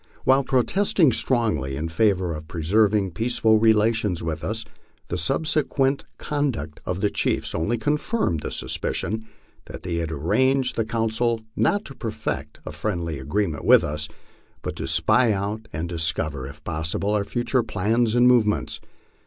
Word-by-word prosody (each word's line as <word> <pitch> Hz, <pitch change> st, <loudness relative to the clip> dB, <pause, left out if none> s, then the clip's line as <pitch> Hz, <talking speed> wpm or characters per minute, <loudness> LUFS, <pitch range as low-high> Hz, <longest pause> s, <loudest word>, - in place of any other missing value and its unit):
While 135 Hz, +1 st, +4 dB
protesting 150 Hz, -, +3 dB
strongly 110 Hz, -, 0 dB
in 80 Hz, +4 st, -3 dB
favor 95 Hz, 0 st, +1 dB
of 75 Hz, 0 st, -7 dB
preserving 100 Hz, +4 st, +2 dB
peaceful 110 Hz, +2 st, +2 dB
relations 110 Hz, -4 st, +2 dB
with 80 Hz, -1 st, -3 dB
us, 110 Hz, +5 st, -3 dB, 0.4 s
the -, -, -2 dB
subsequent 140 Hz, -, +1 dB
con 145 Hz, -1 st, 0 dB
duct 75 Hz, -, -6 dB
of 90 Hz, +1 st, -2 dB
the 105 Hz, -, +2 dB
chiefs -, -, -1 dB
only 95 Hz, +9 st, 0 dB
confirmed 150 Hz, -, 0 dB
the -, -, -4 dB
suspicion 110 Hz, +1 st, -3 dB, 0.4 s
that -, -, -9 dB
they 85 Hz, -2 st, -2 dB
had 85 Hz, -1 st, -2 dB
arranged 130 Hz, -, +1 dB
the 115 Hz, -, 0 dB
council 115 Hz, +1 st, 0 dB
not 205 Hz, +1 st, +1 dB
to 135 Hz, -, -9 dB
perfect 110 Hz, -, -4 dB
a -, -, -5 dB
friendly 85 Hz, -8 st, -3 dB
agreement 80 Hz, +3 st, -1 dB
with -, -, +6 dB
us, 75 Hz, +1 st, -3 dB, 0.5 s
but -, -, -4 dB
to -, -, -4 dB
spy 110 Hz, +9 st, +3 dB
out 105 Hz, +3 st, -3 dB
and 80 Hz, +3 st, -3 dB
discover, 80 Hz, -5 st, -2 dB
if 75 Hz, +2 st, -12 dB
possible, 80 Hz, +6 st, -2 dB
our 105 Hz, -1 st, +1 dB
future 120 Hz, +4 st, 0 dB
plans 110 Hz, +2 st, 0 dB
and 120 Hz, 0 st, +5 dB
movements. 105 Hz, -, +2 dB
105 Hz, 155 wpm, -24 LUFS, 80-120 Hz, 0.5 s, with